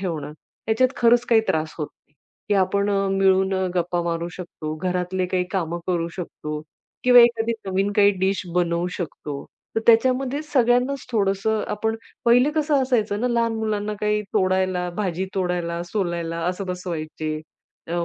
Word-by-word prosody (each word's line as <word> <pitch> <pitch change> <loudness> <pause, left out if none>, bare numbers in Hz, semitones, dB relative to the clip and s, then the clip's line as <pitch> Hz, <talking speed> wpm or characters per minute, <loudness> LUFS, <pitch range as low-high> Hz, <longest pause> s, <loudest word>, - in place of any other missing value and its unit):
ठेवणं, 155 -6 -4 0.4
याच्यात 225 +4 +4
खरंच 240 0 +4
काही 225 -1 +6
त्रास 155 0 0
होत 150 - -2
नाही, 145 - -42 0.3
की 205 - +3
आपण 200 +2 +1
अ, 195 -1 +1
मिळून 190 0 +3 0.2
गप्पा 175 0 0
मारू 170 0 -2
शकतो. 155 -3 -6
घरातले 180 +2 -1
काही 180 0 0
कामं 170 -3 -1
करू 170 -2 0
शकतो 150 -4 -5 0.4
किंवा 250 -1 +8
एखादी 235 -1 +3
नवीन 195 +1 0
काही 205 0 +6
डिश 195 0 +1
बनवू 175 0 +1
शकतो. 150 -4 -5 0.3
तर - - +3
त्याच्यामध्ये 255 +4 +3
सगळ्यांनाच 255 -1 +2
थोडंसं, 210 0 +1
आपण 220 +2 -1 0.3
पहिले 245 +4 +5
कसं 300 -3 +2
असायचं 220 -5 0
ना, 250 - +1
लहान 230 -1 +1
मुलांना 210 -1 -2
काही 210 0 +1
तोडायला, 185 -1 +1
भाजी 190 -2 -1
तोडायला, 175 -2 -1
सोलायला 170 -3 -2
असं 185 +2 -2
बसवायचे. 165 -4 -4 0.5
अ, 170 0 -1
190 Hz, 150 wpm, -23 LUFS, 175-225 Hz, 0.5 s, किंवा